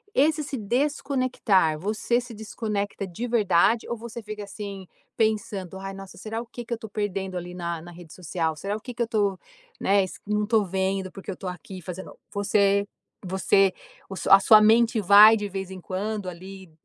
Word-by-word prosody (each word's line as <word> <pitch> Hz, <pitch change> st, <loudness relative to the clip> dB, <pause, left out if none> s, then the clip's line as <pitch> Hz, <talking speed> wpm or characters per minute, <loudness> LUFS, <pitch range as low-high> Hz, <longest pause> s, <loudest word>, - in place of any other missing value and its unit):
Esse 305 Hz, +2 st, +3 dB
se 275 Hz, -2 st, -5 dB
desconectar, 245 Hz, -, +1 dB
você 215 Hz, +5 st, 0 dB
se 240 Hz, -1 st, -10 dB
desconecta 210 Hz, -2 st, -4 dB
de 225 Hz, +8 st, -5 dB
verdade 220 Hz, -1 st, +3 dB
ou 235 Hz, -, -1 dB
você 235 Hz, +1 st, -8 dB
fica 210 Hz, 0 st, -6 dB
assim, 200 Hz, -2 st, -8 dB, 0.3 s
pensando: 205 Hz, -4 st, -1 dB
"ai 195 Hz, 0 st, -6 dB
nossa, 195 Hz, 0 st, -10 dB
será 220 Hz, +3 st, -4 dB
o 235 Hz, -, -9 dB
que 240 Hz, 0 st, -8 dB
que 235 Hz, -, -4 dB
eu -, -, -2 dB
tô 220 Hz, -, -8 dB
perdendo 195 Hz, -3 st, -3 dB
ali 180 Hz, 0 st, -6 dB
na 170 Hz, -2 st, -4 dB
na 175 Hz, -, -11 dB
rede 170 Hz, -2 st, -13 dB
social? 165 Hz, -2 st, -2 dB
Será 200 Hz, +6 st, -3 dB
o -, -, -13 dB
que 250 Hz, 0 st, -8 dB
que 235 Hz, -, -1 dB
eu -, -, -3 dB
tô", 205 Hz, -4 st, 0 dB, 0.4 s
né, 200 Hz, 0 st, +3 dB
esse, 185 Hz, -, -7 dB
"não 210 Hz, 0 st, +1 dB
estou 215 Hz, -1 st, +2 dB
vendo, 190 Hz, 0 st, -1 dB
porque 195 Hz, +1 st, -10 dB
eu -, -, -6 dB
estou 185 Hz, -, -6 dB
aqui 180 Hz, +2 st, -9 dB
fazendo", 180 Hz, +3 st, -8 dB, 0.2 s
você 200 Hz, 0 st, +2 dB, 0.4 s
você 190 Hz, +1 st, +3 dB, 0.4 s
o 195 Hz, -, -6 dB, 0.2 s
a 195 Hz, -, +10 dB
sua 215 Hz, +2 st, +7 dB
mente 225 Hz, +1 st, +4 dB
vai 210 Hz, +3 st, +8 dB
de 205 Hz, -1 st, -4 dB
vez 190 Hz, 0 st, -5 dB
em 185 Hz, -1 st, -8 dB
quando 200 Hz, +1 st, -3 dB
ali, 185 Hz, 0 st, -11 dB
200 Hz, 195 wpm, -25 LUFS, 190-220 Hz, 0.4 s, a